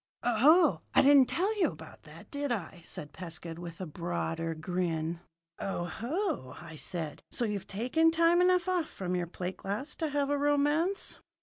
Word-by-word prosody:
"Oh, 275 +10 +5
I - - +7
didn't 275 -2 +7
tell 390 +6 +1
you - - +5
about - - -9
that, - - -13
did 285 -2 -2
I?" 185 -5 -3
said 145 -3 -6
Pescud 170 -2 -7
with 170 -1 -8
a 185 - -3
broader 90 - -3
grin. 165 0 -2 0.4
"O 190 -3 -2
ho!" 235 - -3
I 165 0 -10
said. 160 -1 -4
"So 240 - -2
you've 205 -3 -3
taken 255 +11 +2
time 335 +2 +4
enough 360 0 +4
off 360 -4 0
from 180 -1 -3
your 175 -1 -1
plate 180 +2 -5
glass 235 +10 -4
to 320 -2 -1
have 285 -1 0
a 290 - +1
romance?" 295 +6 +1
215 Hz, 175 wpm, -31 LUFS, -, 0.4 s, I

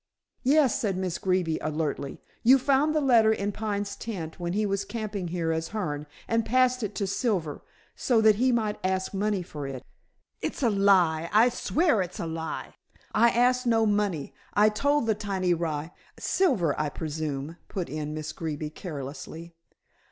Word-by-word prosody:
"Yes," 275 -1 +3
said 195 -4 0
Miss 185 -2 -2
Greeby 180 -4 0
alertly. 150 -3 -3 0.2
"You 255 +4 +7
found 280 +3 +2
the - - +4
letter 235 -5 +5
in 205 -1 -1
Pine's 205 -1 -3
tent 175 -9 -6
when 175 0 -2
he 210 +2 +1
was 200 0 0
camping 205 -3 -4
here 165 -1 -1
as 160 0 -1
Hearne, 150 -9 -3 0.2
and 230 0 +1
passed 255 +2 +2
it 210 - -3
to 200 - -1
Silver 190 - -1 0.3
so 240 -3 +2
that 220 -2 +5
he 255 +3 +3
might 220 -3 0
ask 190 +1 -1
money 200 -1 0
for 150 -4 -6
it." 130 -2 -6 0.6
"It's - - -3
a 235 - +4
lie. 180 -5 +3
I 225 +4 +6
swear 280 - +1
it's 180 -1 -5
a - - -2
lie. 160 0 -5 0.4
I 235 +2 +5
ask 250 +2 +2
no 225 -1 +4
money. 205 -8 0 0.2
I 210 +1 +6
told 285 +5 +1
the 220 - +3
tiny 195 -4 0
rye 160 -1 -2 0.2
" - - -33 0.2
"Silver, 225 - +3
I 150 - 0
presume," 155 0 -4
put 185 -4 -4
in 150 0 -4
Miss 155 -1 -4
Greeby 155 -2 -4
carelessly. 160 +1 -7
195 Hz, 175 wpm, -27 LUFS, 160-225 Hz, 0.6 s, You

